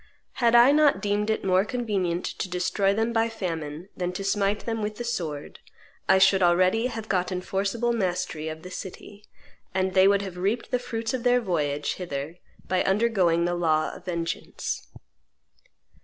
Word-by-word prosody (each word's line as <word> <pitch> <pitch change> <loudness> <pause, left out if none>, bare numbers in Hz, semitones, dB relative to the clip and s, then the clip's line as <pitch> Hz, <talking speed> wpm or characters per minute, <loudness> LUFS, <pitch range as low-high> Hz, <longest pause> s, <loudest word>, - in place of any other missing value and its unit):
Had 235 0 +4
I 240 +3 +8
not 295 -1 +4
deemed 210 +1 0
it 220 - 0
more 185 0 +4
convenient 200 -7 -2
to 190 - -4
destroy 180 +2 +1
them 225 +3 0
by 225 0 +2
famine 165 -6 -5
than 180 -1 -2
to 195 - -4
smite 200 +1 +1
them 225 -1 -2
with 210 0 -3
the 240 - -5
sword, 165 -12 -4 0.5
I 190 - +7
should 195 0 +5
already 185 +6 +3
have 225 -3 -6
gotten 180 -2 0
forcible 200 +6 -1
mastery 180 -6 -2
of 155 0 -8
the 180 - -9
city, 200 +2 -9 0.5
and 190 0 0
they 190 +1 +6
would 200 0 +3
have 185 -2 -7
reaped 210 +8 -1
the 250 - +1
fruits 230 -2 -4
of 255 - -2
their 245 +1 +3
voyage 150 -9 -1
hither 160 -1 -5 0.3
by 185 -1 +1
undergoing 190 -5 +2
the 175 - 0
law 160 -3 +1
of - - -12
vengeance." 170 -2 -4
195 Hz, 170 wpm, -26 LUFS, 175-225 Hz, 0.5 s, I